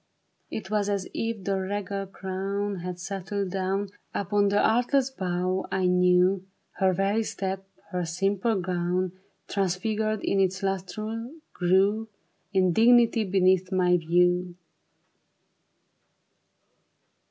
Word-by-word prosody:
It 205 -2 -6
was 205 -1 +1
as 200 -2 -1
if 225 -4 -3
a 195 -1 +1
regal 195 0 -3
crown 195 +1 -3
Had 180 0 -5
settled 195 +1 -3
down 195 +1 -1 0.3
Upon 205 +1 +1
the 200 +1 +2
artless 250 +4 +2
brow 185 -3 -1
I 190 -1 +1
knew; 180 +1 +3 0.4
Her 190 -1 +4
very 195 +4 +1
step, 195 -2 -4 0.2
her 180 -1 -1
simple 195 +5 0
gown. 180 0 -1 0.4
Transfigured 210 +3 -1
in 195 - +1
its 190 0 +1
lustre, 215 +5 -3 0.2
grew 195 +5 +2 0.4
In 185 -3 +3
dignity 235 +1 +5
beneath 185 -1 +2
my 180 -1 +3
view. 175 +1 +2
195 Hz, 110 wpm, -27 LUFS, 180-205 Hz, 0.4 s, dignity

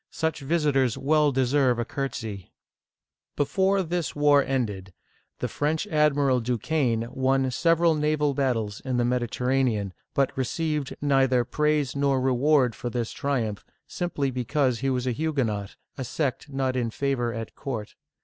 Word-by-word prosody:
Such 160 -1 -2
vis 155 +3 0
itors 135 -5 +2
well 150 +1 +3
deserve 130 -1 +2
a 120 - -1
curtsy! 110 -8 -5 0.4
" - - -65
Before 190 +7 +2
this 170 -3 -2
war 145 -1 +5
ended, 105 -9 -2 0.4
the - - -2
French 155 +5 -1
admiral 145 -6 +2
Duquesne 120 +1 0
(dii - - -3
kan') 120 - -12
won 130 0 +1
several 165 +4 +3
naval 150 -1 +1
battles 115 -7 -1
in 130 -2 -2
the 120 - +2
Mediterranean, 125 -4 0 0.2
but 140 -1 +1
received 150 +2 -2
neither 135 -3 +3
praise 150 +1 0
nor 140 -1 +2
reward 130 0 +3
for 120 - -5
this 120 -1 -3
triumph, 120 -7 -2 0.2
simply 145 -6 -2
because 125 0 0
he 135 - 0
was 125 -1 -1
a 125 - 0
Hu 160 +5 -2
guenot, 105 -7 -2
— - - -42
a - - -1
sect 135 +2 -2
not 135 -1 -1
in 120 -2 0
favor 120 -1 -1
at 115 -1 -6
court. 115 -6 -5
135 Hz, 160 wpm, -26 LUFS, 120-150 Hz, 0.4 s, war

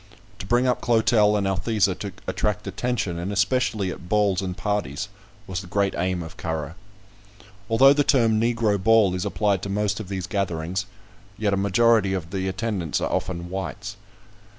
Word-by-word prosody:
To 95 - -7
bring 120 +3 +3
up 125 -1 +1
Clotel 110 -2 +3
and 100 - -1
Althesa 95 +1 +1
to 100 - -5
attract 105 0 -1
attention, 115 -9 -2
and 90 +4 -3
especially 105 -2 +1
at 90 - -10
balls 100 -3 +2
and 90 -1 -4
parties, 105 -9 -2 0.4
was 95 -2 -4
the 90 - -11
great 100 +2 0
aim 90 0 -1
of 80 - -11
Currer. 80 -1 -4 1.0
Although 135 +5 +6
the 145 0 +2
term 115 -6 +3
"Negro 115 -4 +1
ball" 110 -3 +5
is 90 0 -2
applied 100 -3 0
to 100 - -5
most 105 +1 0
of 110 - -6
these 95 -3 -3
gatherings, 95 -1 -2 0.5
yet 105 -2 0
a - - +3
majority 100 +1 +3
of 85 -2 -5
the 95 -1 -2
attendants 95 -4 -2
are - - -2
often 90 -1 -3
whites. 105 +2 -5
100 Hz, 175 wpm, -24 LUFS, 95-110 Hz, 1.0 s, Although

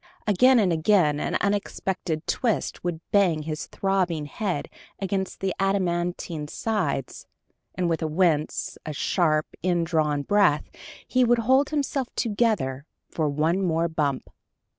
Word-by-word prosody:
Again 250 +5 +5
and 195 -6 +3
again, 160 -3 +3
an - - -2
unexpected 190 -5 -2
twist 230 -4 -1
would 175 -2 -3
bang 180 -7 +3
his 155 0 -4
throbbing 185 -5 0
head 180 0 -3 0.3
against 195 -1 -3
the 195 -1 0
adamantine 175 -4 -1
sides, 160 - -2 0.5
and 180 -1 0
with 165 -1 0
a 160 - 0
wince, 155 -2 0
a 155 - -5
sharp, 155 0 +1 0.2
in 175 -2 +1
drawn 155 -4 0
breath, 200 -5 +2 0.4
he 255 0 +3
would 240 0 +4
hold 265 +3 +4
himself 280 -3 -1
"together" 205 - 0 0.2
for 155 -3 0
one 160 +6 +1
more 165 -2 +1
bump! 150 -5 -2
175 Hz, 135 wpm, -25 LUFS, 155-200 Hz, 0.5 s, Again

